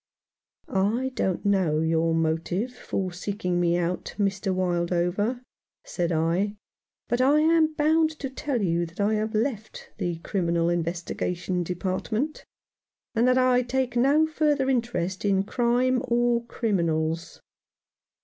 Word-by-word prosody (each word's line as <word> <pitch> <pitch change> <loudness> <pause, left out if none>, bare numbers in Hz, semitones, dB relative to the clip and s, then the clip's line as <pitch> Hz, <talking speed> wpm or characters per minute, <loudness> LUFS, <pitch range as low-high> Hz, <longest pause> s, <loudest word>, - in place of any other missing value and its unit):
"I 220 +7 +1
don't 190 -6 -1
know 185 -7 +2
your 165 0 +1
motive 165 +8 -1
for 190 -6 -4
seeking 180 -1 -2
me 175 0 +2
out, 175 +1 -2
Mr. 195 -1 0
Wildover," 180 +6 0 0.4
said 175 -1 -2
I, 170 +6 +1 0.5
"but 240 +2 0
I 285 +4 +5
am 320 0 +3
bound 315 +2 +3
to 275 - -4
tell 265 -4 -2
you 170 -1 +1
that 165 +4 -17
I 205 +2 +2
have 215 +1 -1
left 220 -1 -3
the 175 -3 -1
Criminal 170 -3 0
Investigation 175 +1 -2
Department, 190 - -3 0.7
and 235 +1 +2
that 255 0 +4
I 255 -1 +4
take 250 0 -1
no 280 +6 +4
further 300 -4 +1
interest 190 -7 -1
in 195 -2 +2
crime 245 +3 +1
or 240 0 +2
criminals." 170 -8 -1
200 Hz, 130 wpm, -26 LUFS, 175-250 Hz, 0.7 s, I